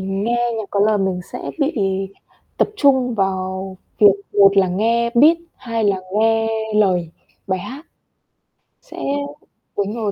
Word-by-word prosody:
nghe 220 +6 -1
nhạc 220 - -3
có 200 - 0
lời 210 +1 +3
mình 190 -2 -1
sẽ 245 - -5
bị 295 +1 0 0.8
tập - - +2
trung 265 - +3
vào 190 -1 -2 0.2
việc 205 -2 +7 0.2
một 200 -1 +5
là 190 -2 +4
nghe 230 +5 +1
beat, 300 +8 +6 0.2
hai 230 -3 -3
là 200 -2 +2 0.2
nghe 225 0 +2 0.3
lời 185 -5 +2 0.4
bài 190 -1 -1
hát. 265 - -9 1.0
Sẽ - - -14 0.8
đúng 205 +1 -1
rồi 220 -3 -2
210 Hz, 140 wpm, -19 LUFS, 195-235 Hz, 1.0 s, việc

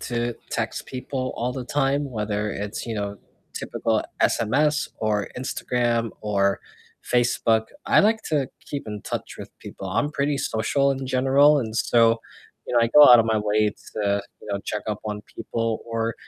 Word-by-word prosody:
to 120 -1 -2 0.2
text - - -2
people 130 0 -4
all 125 +2 -2
the 130 -1 -5
time, 140 +2 +1
whether 105 -2 -2
it's, 105 +4 -5
you 115 - -3
know, 100 -1 -3 0.4
typical - - -1 0.2
SMS 145 +7 +2
or 105 -2 -1
Instagram 120 -2 -1
or 100 -2 +1 0.4
Facebook. 120 -2 +2 0.2
I 275 - +5
like 220 +2 +2
to 145 -4 0 0.2
keep 140 -4 -5
in 105 -1 -5
touch - - -5
with - - -8
people. 95 - -8
I'm 145 +10 0
pretty 145 -1 0
social 135 +2 +1
in 135 -1 -3
general, 135 +3 +4
and 110 -4 -3
so, 115 -1 +3 0.5
you - - -3
know, 120 - +5
I 115 - +3
go 150 -2 +10
out 120 - +10
of 115 - +4
my 110 -1 +2
way 105 0 +2 0.2
to, 100 -1 0 0.2
you - - -11
know, 100 0 -2
check 105 - -3
up 105 -1 -3
on 105 0 -4
people, 115 0 -2
or 115 -1 -2
115 Hz, 175 wpm, -24 LUFS, 105-135 Hz, 0.5 s, go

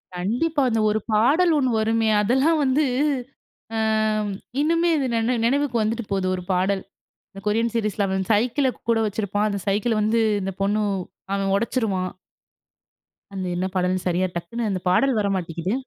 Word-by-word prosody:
கண்டிப்பா. 245 - 0
அந்த 225 -1 0
ஒரு 215 +1 +1
பாடல் 290 +12 +4
1 260 -3 +2
வருமே! 225 0 +1
அதெல்லாம் 265 +9 +2
வந்து 275 +3 +2 1.8
இன்னுமே 335 +3 +2
அது 275 - 0
நினை 230 +2 +1
நினைவுக்கு 275 0 +1
வந்துட்டு 225 +2 -1
போகுது 195 -1 0
ஒரு 180 - -5
பாடல். 190 +1 +1 0.5
இந்த 195 - -10
கொரியன் 230 +2 +1
சீரிஸ்ல 210 -2 0
அவன் 190 0 -1
சைக்கிள் 245 +6 +2 0.2
கூட 230 -1 +3
வச்சிருப்பான். 205 0 -1
அந்த 200 - -2
சைக்கிள் 215 +2 +1
வந்து 220 +2 +2 0.2
இந்த 195 0 -3
பொண்ணு 205 +2 +1 0.5
அவன் 195 -1 0
உடைச்சிருவான். 200 -4 -1 1.2
அந்த 190 -1 -4
என்ன 180 +1 -1
பாடல்ன்னு 185 0 0
சரியா, 180 +1 +1
டக்குனு 220 +6 -3
அந்த 185 -2 -2
பாடல் 255 +6 +3
வர 205 - +1
மாட்டிக்கிது. 175 +2 -3
215 Hz, 150 wpm, -23 LUFS, 195-245 Hz, 1.8 s, பாடல்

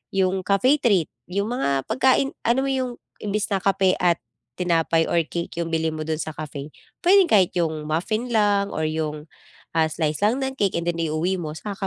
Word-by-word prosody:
'yong 190 0 +1
cafe 255 +9 +3
treat, 200 - +2 0.2
yung 200 +5 -2
mga 140 - 0
pagkain, 260 +3 +3 0.2
ano 245 +3 +3
mo 275 - -1
yung, 260 -2 -1 0.3
imbis 210 +1 -2
na 195 - +2
kape 195 -1 +2
at 175 -1 +3 0.4
tinapay 165 -1 +2
or 170 - +3
cake 170 +1 -4
'yong 170 - -1
bilhin 160 0 +1
mo 155 0 -5
do'n 160 - 0
sa 155 - -4
cafe, 150 -1 -7 0.3
puwedeng 375 +1 +6
kahit 195 - +4
'yong 160 -3 -1
muffin 215 +11 -2
lang 205 -3 +2
or 155 0 -1
'yong, 155 -1 -3 0.5
ah, 160 -1 +4
slice 155 +1 -1
lang 225 +6 +3
ng 265 0 -2
cake, 200 -7 0
and 170 - -5
then 175 - 0
i-uwi 160 +4 0
mo, 165 -4 -4
saka 200 +5 -7
185 Hz, 195 wpm, -23 LUFS, 160-215 Hz, 0.5 s, puwedeng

